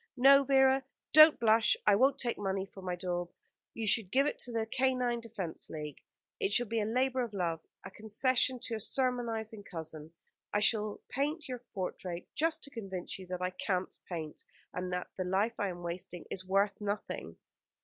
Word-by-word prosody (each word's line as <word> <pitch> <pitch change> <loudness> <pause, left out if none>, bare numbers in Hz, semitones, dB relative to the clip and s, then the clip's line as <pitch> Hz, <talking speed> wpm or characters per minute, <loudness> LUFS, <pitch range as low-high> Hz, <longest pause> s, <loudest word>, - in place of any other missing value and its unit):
No, 275 +2 +8
Vera, 265 -1 +4 0.3
don't 310 +1 +9
blush! 225 -1 +4
I 205 - +6
won't 265 +6 +4
take 240 -2 -2
money 195 -1 -1
for 195 0 -13
my 180 -1 -2
daub. 175 -1 -3 0.5
You 225 - -3
shall 215 +1 +3
give 275 +2 +4
it - - -2
to 245 - -4
the 225 -1 0
Canine 250 0 +1
Defence 215 -7 -5
League. 150 -2 -6 0.4
It 400 -3 0
shall 245 - +3
be 230 0 -1
a - - 0
labour 255 +3 +1
of 230 -4 -4
love; 170 -4 0 0.3
a 190 - -7
concession 245 +5 +1
to - - -5
a 220 - -1
sermonising 230 -3 -1
cousin. 160 -3 -7 0.4
I 205 - +2
shall 210 -1 +1
paint 300 +4 -1
your 250 -2 -4 0.2
portrait, 180 -2 -4
just 325 +1 0
to 280 - -6
convince 195 -5 -5
you 185 - -9
that 180 0 -4
I 180 - 0
can't 185 0 -2
paint, 160 -4 -5 0.3
and 180 0 -3
that 180 0 -3
the 185 - 0
life 195 +5 0
I 205 - +1
am 175 -1 -7
wasting 175 0 -5
is 185 - -4
worth 200 +2 +1
nothing." 205 0 -4
210 Hz, 190 wpm, -32 LUFS, 185-250 Hz, 0.5 s, don't